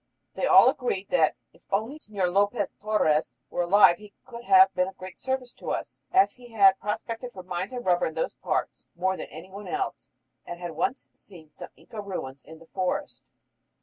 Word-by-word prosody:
They - - -1
all - - +8
agreed 200 -6 -1
that 270 - +3 0.2
"if - - -26
only 220 +10 -1
Señor 195 -8 -2
Lopez 205 +2 +1
Torres 205 -8 +1 0.2
were - - -1
alive 175 0 +6
he 210 -1 -14
could 235 -1 -10
have 380 0 +7
been 180 0 +1
of 190 - -9
great 185 -1 -10
service" 260 -2 -3
to - - -8
us, - - -4
as 380 +1 +5
"he 245 -2 -15
had 195 -3 +6
prospected 230 +4 -4
for 185 - -9
mines 185 +3 -4
and 245 -1 -6
rubber 180 -1 +3
in 160 - -7
those 160 - -1
parts - - -3
more 185 +2 0
than - - -7
any 165 +4 -11
one 200 +1 -9
else, 390 0 -3 0.4
and 175 - -8
had 175 -1 -5
once 255 - -2
seen 160 -6 -15
some - - -10
Inca 215 - -9
ruins 140 -9 -6
in 160 +4 -13
the 165 - -16
forest!" 185 +2 -3
195 Hz, 200 wpm, -27 LUFS, 180-235 Hz, 0.4 s, all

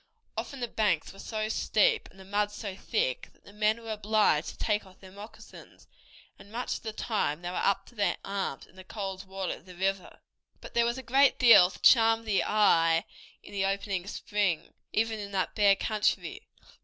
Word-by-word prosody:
Often 275 -2 -5
the 240 - -1
banks 205 -8 0
were 195 - -15
so 215 -1 -3
steep 455 - +1
and 190 - -20
the 190 - -12
mud 205 +1 0
so 205 -2 -6
thick 190 - -2
that - - -31
the 200 - -15
men 215 +2 +1
were 225 - -6
obliged 210 -6 +1
to - - -11
take 210 -1 0
off 190 -1 -18
their 190 -1 -14
moccasins, 205 +3 -13 0.5
and 200 +1 -15
much 245 +2 -3
of - - -15
the 220 - -5
time 200 -8 -2
they 175 - -3
were 180 - -4
up 195 0 +1
to - - -18
their 210 -3 0
arms 195 -8 -4
in - - -24
the 185 - -10
cold 195 -1 -6
water 190 -1 -3
of - - -13
the 180 - -12
river. 195 +1 -2 0.4
But - - -12
there 235 0 +3
was 235 +1 -1
a 260 - -7
great 270 +3 +4
deal 230 -7 +8
to 185 - -12
charm 225 -1 +5
the 210 -3 +1
eye 165 -6 +3 0.4
in - - -13
the 195 -1 0
opening 195 -1 -2
spring, 200 -5 -2 0.2
even 220 0 0
in 200 -1 -7
that 185 -3 -1
bare 205 -2 +5
country. 215 +1 -1
205 Hz, 205 wpm, -29 LUFS, 190-220 Hz, 0.5 s, deal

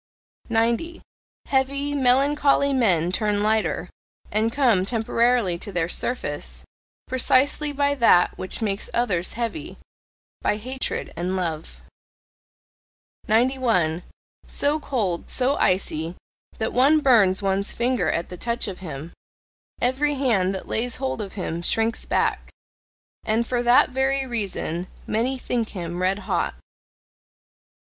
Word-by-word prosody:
90. 235 +9 0 0.4
Heavy, 280 +2 0
melancholy 280 +1 +3
men 180 -10 +2
turn 205 +1 +1
lighter, 220 +1 0 0.4
and 220 +2 +1
come 235 -8 +3
temporarily 230 -3 +1
to 200 - -5
their 175 -3 0
surface, 145 - -3 0.4
precisely 265 +3 +2
by 285 0 +1
that 230 -9 +4
which 185 +5 -4
makes 200 -1 -2
others 195 -7 0
heavy 240 +7 -4 0.6
by 210 - +1
hatred 260 +4 -4
and 180 +2 -2
love. 165 -4 -4 1.5
91. 225 -8 +2 0.5
So 295 +2 0
cold, 205 - -2
so 265 +2 +2
icy, 170 -3 0 0.4
that 220 - -2
one 280 +5 +5
burns 210 -8 +4
one's 195 +1 0
finger 245 +1 0
at 170 - -2
the 180 - -7
touch 235 +4 -2
of 190 -3 -6
him! 160 -3 -7 0.7
Every 280 +4 +1
hand 225 -9 +2
that 190 - -7
lays 240 +2 -1
hold 260 -4 -3
of 200 -2 -6
him 170 -4 -4
shrinks 225 +6 0
back! - - 0 0.7
And 225 +2 +1
for 245 0 -1
that 245 +1 +5
very 265 +1 +1
reason 195 -7 -3 0.2
many 245 +5 0
think 240 -3 -2
him 175 -2 -5
red 190 +2 +1
hot. - - -1
230 Hz, 125 wpm, -23 LUFS, 185-260 Hz, 1.5 s, one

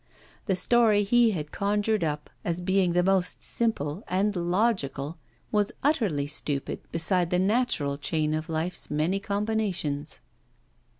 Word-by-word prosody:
The 190 - +2
story 215 +1 +4
he 235 +3 +4
had 150 -7 -4
conjured 205 0 0
up 150 -1 -3
as 170 0 -1
being 185 0 +1
the 180 0 +3
most 190 -1 +1
simple 195 -6 -1
and 200 +3 +1
logical 170 - 0 0.3
was 210 -1 +1
utterly 220 - +1
stupid 145 -1 -1
beside 175 +1 +2
the 180 - +1
natural 185 - +1
chain 155 0 0
of 155 +1 -3
life's 165 +3 -3
many 155 +6 0
combinations. 200 -8 -2
180 Hz, 130 wpm, -27 LUFS, 155-210 Hz, 0.3 s, story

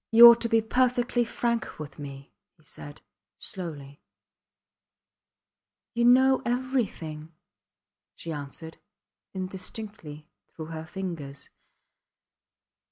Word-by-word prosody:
You 235 +1 +11
ought 235 0 +8
to 230 - +1
be 225 0 +4
perfectly 245 +1 +2
frank 235 0 -2
with 150 -2 -9
me, 140 -1 -9 0.2
he 155 - -26
said, 145 0 -10 0.4
slowly. 145 -6 -8 1.9
You 235 0 +2
know 260 +2 +6
everything, 225 - -2 0.8
she 165 - -6
answered, 150 +3 -8 0.6
indistinctly, 185 -4 -6 0.3
through 160 0 -7
her 160 0 -6
fingers. 155 -6 -6
185 Hz, 95 wpm, -27 LUFS, 150-235 Hz, 1.9 s, You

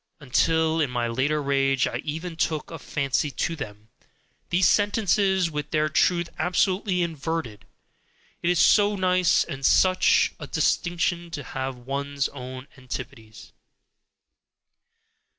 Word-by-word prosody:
until 160 +3 +1
in 145 - +1
my 120 -1 -1
later 140 +6 0
rage 135 -2 +2
I - - -3
even 165 +3 -5
took 155 0 -2
a 165 - -7
fancy 140 0 -1
to 165 +5 -2
them, 110 -7 -9 0.6
these 175 0 +3
sentences 195 -3 +2
with 150 -1 -4
their 155 0 +1
truth 170 +3 +2
absolutely 185 +2 +1
inverted! 160 -8 -4 0.7
It 170 - 0
is 175 -2 +2
so 205 0 +5
nice 185 -2 +3
and 135 0 -7
such 185 +6 +4
a - - -7
distinction 175 0 0
to 150 -4 -6
have 130 0 -5
one's 140 +2 -3
own 130 0 -8
antipodes! 125 -4 -9
155 Hz, 125 wpm, -25 LUFS, 135-175 Hz, 0.7 s, so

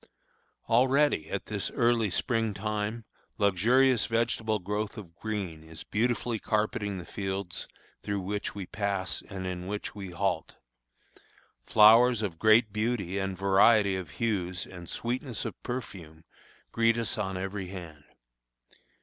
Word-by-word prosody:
Already, 130 - +3
at - - -3
this - - -1
early 115 -2 +2
spring 110 +2 0
time, 105 +2 -3 0.3
a 105 - -2
luxurious 115 +5 +4
vegetable 115 -1 0
growth 105 +3 -3
of 85 -6 -10
green 95 -6 -4
is 80 0 -11
beautifully 115 +1 0
carpeting 105 -2 -1
the 90 - -7
fields 95 -2 -4 0.3
through 100 -1 -2
which 105 +3 -3
we 100 -2 -5
pass 100 -1 -2
and 95 -2 -5
in 90 -1 -4
which 105 +1 -4
we 100 -2 -7
halt. 85 - -2 1.1
Flowers 115 +2 +6
of 85 -6 -3
great 110 0 +5
beauty 105 -4 -1
and 95 -1 -3
variety 100 +1 +4
of 95 -4 -5
hues 95 -5 -2
and 90 -2 -10
sweetness 120 +1 -3
of - - -6
perfume 90 -10 -7 0.5
greet 115 0 +3
us 115 -2 -1
on 95 -2 -2
every 95 0 -4
hand. 85 -6 -9
105 Hz, 135 wpm, -29 LUFS, 95-115 Hz, 1.1 s, Flowers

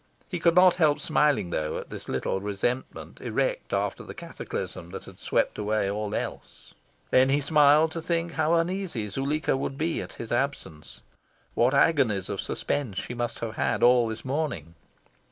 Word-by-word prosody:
He 175 - -4
could 170 0 +3
not 180 0 +7
help 150 -2 +4
smiling, 150 - +2
though, 75 -2 -2
at - - -8
this - - -8
little 95 - -1
resentment 105 +6 -3
erect - - -1
after - - -1
the - - -9
cataclysm 165 - -6
that 95 +2 -8
had - - -13
swept - - 0
away 105 -1 0
all 105 0 -3
else. - - -6 0.4
Then 130 +1 +5
he 140 +2 +3
smiled 150 +1 +5
to 165 - -4
think 170 +1 -1
how 160 +1 +2
uneasy 170 - -1
Zuleika 140 +7 0
would 135 0 -3
be 160 +2 -1
at - - -8
his 115 - -8
absence. 120 - -3 0.5
What 125 +4 +3
agonies 130 - +3
of - - -2
suspense 120 -10 -3
she 125 - -3
must 120 -1 -3
have 115 -1 -4
had - - 0
all 120 -1 +6
this 110 +2 -6
morning! 130 - -3
135 Hz, 170 wpm, -27 LUFS, 110-160 Hz, 0.5 s, not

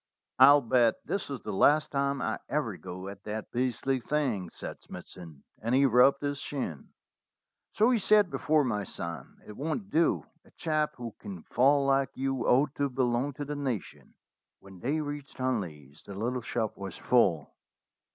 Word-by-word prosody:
"I'll 140 +2 +8
bet 120 -2 +3
this 195 - -3
is 135 -3 -5
the 105 - -5
last 150 +9 +4
time 140 -1 0
I - - -2
ever - - -1
go 90 +2 -8
at 100 +1 -9
that 110 0 -5
beastly 130 +2 0
thing," 120 - -1
said - - -8
Smithson, 80 -6 -11 0.2
and 115 +3 0
he 140 +1 +5
rubbed 135 +3 +5
his 145 -1 -2
shin. 125 - -5 0.8
"So 220 +4 +4
you 240 - +3
said 210 -2 +4
before, 155 -1 +2
my 105 -6 -1
son. 85 -3 -7
It 105 - -10
won't 160 - -4
do. 165 +1 +2 0.2
A - - -22
chap 155 -2 -1
who 120 -3 -7
can 95 -4 -8
fall 140 +3 +3
like 135 -1 +2
you 135 -1 -1
ought 135 +3 +3
to 140 -1 +1
belong 125 +1 0
to 145 +2 -5
the 150 +1 -4
nation." 130 -7 -5 0.4
When 95 -2 -14
they 145 - -1
reached 145 -1 -6
Hunley's 85 - -3
the 100 - -10
little 120 +5 -2
shop 115 -2 -2
was 95 -3 -6
full. 90 - +2
130 Hz, 170 wpm, -29 LUFS, 105-145 Hz, 0.8 s, I'll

